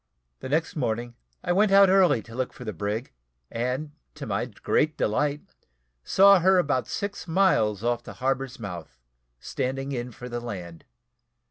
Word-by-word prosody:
The -, -, -7 dB
next 160 Hz, +3 st, 0 dB
morning, 120 Hz, -4 st, -2 dB, 0.3 s
I 180 Hz, -, -1 dB
went 200 Hz, +3 st, +3 dB
out 195 Hz, 0 st, +7 dB
early 185 Hz, -, +4 dB
to 115 Hz, -, -13 dB
look 130 Hz, +1 st, -3 dB
for 125 Hz, -, -10 dB
the 110 Hz, -, -4 dB
brig, 105 Hz, -, -4 dB, 0.4 s
and, 125 Hz, +6 st, -2 dB, 0.2 s
to -, -, -7 dB
my -, -, -1 dB
great 155 Hz, 0 st, 0 dB
delight, 145 Hz, +7 st, 0 dB, 0.6 s
saw 195 Hz, -, +6 dB
her 190 Hz, +2 st, +4 dB
about 145 Hz, -7 st, +1 dB
six 200 Hz, -2 st, -4 dB
miles 140 Hz, -, +2 dB
off 120 Hz, 0 st, 0 dB
the -, -, -10 dB
harbour's 130 Hz, 0 st, -2 dB
mouth, 90 Hz, -, -8 dB, 0.4 s
standing 135 Hz, -, -3 dB
in 125 Hz, -2 st, -4 dB
for 125 Hz, +2 st, -9 dB
the 120 Hz, -1 st, -4 dB
land. 90 Hz, -8 st, -8 dB
130 Hz, 160 wpm, -26 LUFS, 115-165 Hz, 0.6 s, out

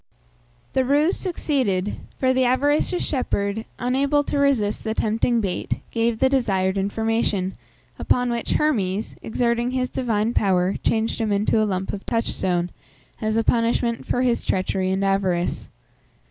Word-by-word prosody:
The 265 Hz, -, +3 dB
ruse 295 Hz, +7 st, +2 dB
succeeded, 255 Hz, -, -1 dB, 0.2 s
for 260 Hz, -1 st, +2 dB
the 260 Hz, 0 st, +2 dB
avaricious 290 Hz, +7 st, +2 dB
shepherd, 220 Hz, -6 st, -1 dB
unable 275 Hz, +4 st, +1 dB
to 285 Hz, -, -1 dB
resist 255 Hz, -8 st, +1 dB
the 220 Hz, 0 st, -2 dB
tempting 230 Hz, +2 st, +1 dB
bait, 190 Hz, -4 st, -2 dB
gave 230 Hz, 0 st, +1 dB
the 265 Hz, -, +3 dB
desired 195 Hz, -8 st, +1 dB
information, 200 Hz, -1 st, 0 dB, 0.5 s
upon 245 Hz, -1 st, +1 dB
which 235 Hz, -1 st, -2 dB
Hermes, 215 Hz, -9 st, 0 dB
exerting 235 Hz, +1 st, 0 dB
his 255 Hz, 0 st, -1 dB
divine 230 Hz, -3 st, 0 dB
power, 190 Hz, -2 st, +2 dB
changed 225 Hz, +1 st, 0 dB
him 220 Hz, -2 st, 0 dB
into 210 Hz, +2 st, +2 dB
a -, -, +3 dB
lump 190 Hz, 0 st, -2 dB
of 200 Hz, -, -5 dB
touchstone, 180 Hz, -6 st, -1 dB, 0.5 s
as 220 Hz, 0 st, 0 dB
a 225 Hz, -, +2 dB
punishment 235 Hz, 0 st, +1 dB
for 250 Hz, -, +1 dB
his 245 Hz, -2 st, +1 dB
treachery 185 Hz, 0 st, 0 dB
and 190 Hz, +1 st, 0 dB
avarice. 190 Hz, -3 st, 0 dB
225 Hz, 145 wpm, -23 LUFS, 195-255 Hz, 0.5 s, The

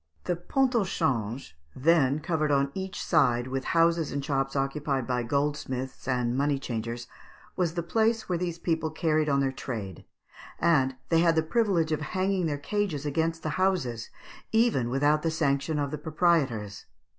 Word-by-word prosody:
The 180 Hz, -, -1 dB
Pont 255 Hz, +10 st, 0 dB
au 230 Hz, -4 st, +3 dB
Change 120 Hz, -, -2 dB, 0.2 s
(then 145 Hz, 0 st, +3 dB
covered 155 Hz, -2 st, 0 dB
on 140 Hz, 0 st, +2 dB
each 190 Hz, +1 st, -5 dB
side 125 Hz, -7 st, +3 dB
with 130 Hz, 0 st, -3 dB
houses 165 Hz, -2 st, +3 dB
and 140 Hz, 0 st, -3 dB
shops 135 Hz, -2 st, -1 dB
occupied 135 Hz, -1 st, -1 dB
by 125 Hz, 0 st, 0 dB
goldsmiths 130 Hz, 0 st, -2 dB
and 125 Hz, -2 st, 0 dB
money 140 Hz, +1 st, +1 dB
changers) 120 Hz, -2 st, -4 dB, 0.5 s
was 175 Hz, -2 st, 0 dB
the 170 Hz, -, -1 dB
place 220 Hz, +5 st, +1 dB
where 175 Hz, -2 st, -1 dB
these 175 Hz, -2 st, -2 dB
people 160 Hz, -2 st, -1 dB
carried 155 Hz, -1 st, +1 dB
on 140 Hz, -1 st, +2 dB
their 135 Hz, -1 st, +1 dB
trade; 110 Hz, -9 st, -6 dB, 0.5 s
and 135 Hz, -6 st, +2 dB
they 165 Hz, -, +4 dB
had 165 Hz, -1 st, +4 dB
the 160 Hz, -, +3 dB
privilege 175 Hz, -4 st, +1 dB
of 155 Hz, 0 st, 0 dB
hanging 185 Hz, +3 st, 0 dB
their 145 Hz, -2 st, -1 dB
cages 165 Hz, -2 st, -2 dB
against 160 Hz, +2 st, -1 dB
the 155 Hz, -, -1 dB
houses, 130 Hz, -12 st, 0 dB, 0.4 s
even 220 Hz, -, +2 dB
without 145 Hz, +4 st, +2 dB
the 165 Hz, -, 0 dB
sanction 150 Hz, -1 st, 0 dB
of 140 Hz, -1 st, -1 dB
the 150 Hz, -, -4 dB
proprietors. 145 Hz, -, 0 dB
150 Hz, 170 wpm, -28 LUFS, 135-170 Hz, 0.5 s, they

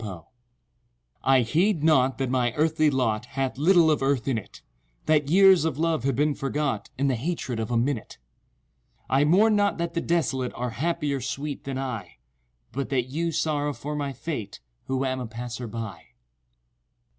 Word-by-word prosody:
TO 95 Hz, -7 st, -7 dB, 0.5 s
—— -, -, -44 dB
I 130 Hz, -, +5 dB
heed 160 Hz, -, +1 dB
not 135 Hz, -5 st, +3 dB
that 135 Hz, -2 st, -1 dB
my 125 Hz, -2 st, +1 dB
earthly 155 Hz, +1 st, +2 dB
lot 120 Hz, -5 st, 0 dB
Hath 135 Hz, -1 st, -1 dB
little 165 Hz, 0 st, +5 dB
of 150 Hz, -, +1 dB
Earth 135 Hz, -2 st, 0 dB
in 135 Hz, -, +1 dB
it— 105 Hz, -3 st, -7 dB, 0.4 s
That 150 Hz, -2 st, +2 dB
years 190 Hz, -1 st, +6 dB
of 160 Hz, -4 st, -1 dB
love 160 Hz, -5 st, 0 dB
have 135 Hz, -2 st, +1 dB
been 150 Hz, +3 st, +2 dB
forgot 140 Hz, -4 st, -2 dB
In 140 Hz, +2 st, +1 dB
the 135 Hz, -, +2 dB
hatred 130 Hz, -2 st, -3 dB
of 110 Hz, -, -3 dB
a 120 Hz, -, +1 dB
minute:— 120 Hz, 0 st, -2 dB, 0.9 s
I 135 Hz, +2 st, +4 dB
mourn 210 Hz, +8 st, +4 dB
not 205 Hz, -1 st, +2 dB
that 170 Hz, 0 st, -2 dB
the 170 Hz, -, -1 dB
desolate 135 Hz, -7 st, 0 dB
Are 125 Hz, 0 st, -3 dB
happier, 145 Hz, +2 st, -1 dB
sweet, 140 Hz, +3 st, -4 dB
than 135 Hz, -1 st, -3 dB
I, 120 Hz, -9 st, -5 dB, 0.5 s
But 135 Hz, +3 st, -3 dB
that 130 Hz, -2 st, 0 dB
you 165 Hz, +3 st, -1 dB
sorrow 145 Hz, -2 st, 0 dB
for 150 Hz, +2 st, -5 dB
my 145 Hz, -2 st, -2 dB
fate 130 Hz, -6 st, -5 dB, 0.3 s
Who 130 Hz, 0 st, -1 dB
am 130 Hz, 0 st, -1 dB
a 125 Hz, -, -4 dB
passer 120 Hz, +1 st, -6 dB
by. 115 Hz, -2 st, -6 dB
135 Hz, 180 wpm, -26 LUFS, 125-155 Hz, 0.9 s, years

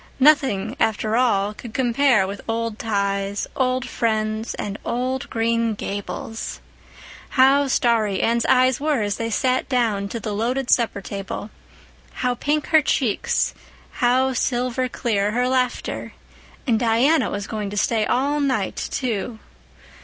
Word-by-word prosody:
Nothing, 270 Hz, -8 st, +3 dB
after 220 Hz, 0 st, +1 dB
all, 210 Hz, -5 st, +2 dB
could 225 Hz, +1 st, -10 dB
compare 245 Hz, -4 st, +3 dB
with 200 Hz, +1 st, -6 dB
old 230 Hz, -1 st, -2 dB
ties, 200 Hz, -2 st, -1 dB
old 255 Hz, 0 st, 0 dB
friends, 220 Hz, -1 st, -1 dB
and 205 Hz, 0 st, -5 dB
old 255 Hz, +2 st, -2 dB
Green 230 Hz, -1 st, 0 dB
Gables! 205 Hz, +2 st, -5 dB, 0.8 s
How 275 Hz, +2 st, +5 dB
starry 225 Hz, -7 st, +2 dB
Anne's 235 Hz, 0 st, +2 dB
eyes 255 Hz, -1 st, +4 dB
were 290 Hz, -6 st, +1 dB
as 205 Hz, -1 st, -1 dB
they 230 Hz, 0 st, -2 dB
sat 255 Hz, +4 st, 0 dB
down 220 Hz, -6 st, 0 dB
to 230 Hz, -, -4 dB
the 215 Hz, -2 st, -4 dB
loaded 245 Hz, +5 st, -1 dB
supper 230 Hz, -5 st, +2 dB
table, 200 Hz, +2 st, -6 dB, 0.7 s
how 250 Hz, -, +2 dB
pink 295 Hz, +4 st, -1 dB
her 315 Hz, -1 st, +6 dB
cheeks, 255 Hz, -6 st, 0 dB, 0.5 s
how 255 Hz, +2 st, +3 dB
silver 250 Hz, +1 st, 0 dB
clear 210 Hz, -4 st, 0 dB
her 250 Hz, +2 st, +1 dB
laughter! 255 Hz, -1 st, -1 dB, 0.5 s
And 230 Hz, -5 st, +2 dB
Diana 245 Hz, +7 st, +3 dB
was 205 Hz, 0 st, -4 dB
going 210 Hz, -2 st, -4 dB
to 205 Hz, -, -6 dB
stay 220 Hz, +2 st, +2 dB
all 280 Hz, +6 st, +1 dB
night, 260 Hz, -9 st, 0 dB
too. 230 Hz, -2 st, -2 dB
230 Hz, 140 wpm, -22 LUFS, 210-255 Hz, 0.8 s, her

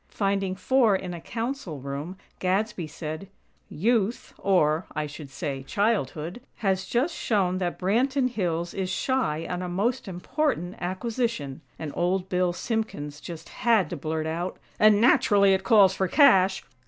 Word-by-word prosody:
Finding 195 Hz, -2 st, -1 dB
four 235 Hz, 0 st, +3 dB
in 185 Hz, -2 st, -4 dB
a 170 Hz, -, -7 dB
Council 230 Hz, -, -4 dB
room, 140 Hz, +7 st, -5 dB, 0.2 s
Gadsby 190 Hz, -1 st, 0 dB
said: 155 Hz, +4 st, -6 dB, 0.4 s
"Youth, 225 Hz, +4 st, 0 dB
or, 165 Hz, -4 st, +2 dB
I 155 Hz, 0 st, -1 dB
should 150 Hz, -1 st, -9 dB
say, 140 Hz, -2 st, -4 dB
childhood, 180 Hz, -, -1 dB
has 190 Hz, -2 st, 0 dB
just 270 Hz, +8 st, +1 dB
shown 185 Hz, -4 st, 0 dB
that 175 Hz, -2 st, -2 dB
Branton 255 Hz, +8 st, +2 dB
Hills 175 Hz, -7 st, -2 dB
is 190 Hz, -1 st, -2 dB
shy 190 Hz, -, 0 dB
on 180 Hz, 0 st, -3 dB
a 180 Hz, -, -4 dB
most 220 Hz, +8 st, -1 dB
important 190 Hz, -, -2 dB
acquisition," 185 Hz, -, -2 dB, 0.2 s
and 155 Hz, -2 st, -5 dB
Old 180 Hz, +2 st, 0 dB
Bill 180 Hz, -1 st, +1 dB
Simpkins 175 Hz, -9 st, -3 dB
just 165 Hz, -1 st, -8 dB
had 220 Hz, -9 st, +2 dB
to -, -, -2 dB
blurt 155 Hz, +1 st, -3 dB
out: 170 Hz, +3 st, -3 dB, 0.2 s
"And, 210 Hz, -1 st, +6 dB
naturally, 205 Hz, -4 st, +5 dB
it 190 Hz, -, 0 dB
calls 200 Hz, -5 st, +6 dB
for 190 Hz, 0 st, 0 dB
cash! 195 Hz, -, +5 dB
190 Hz, 150 wpm, -26 LUFS, 165-220 Hz, 0.4 s, And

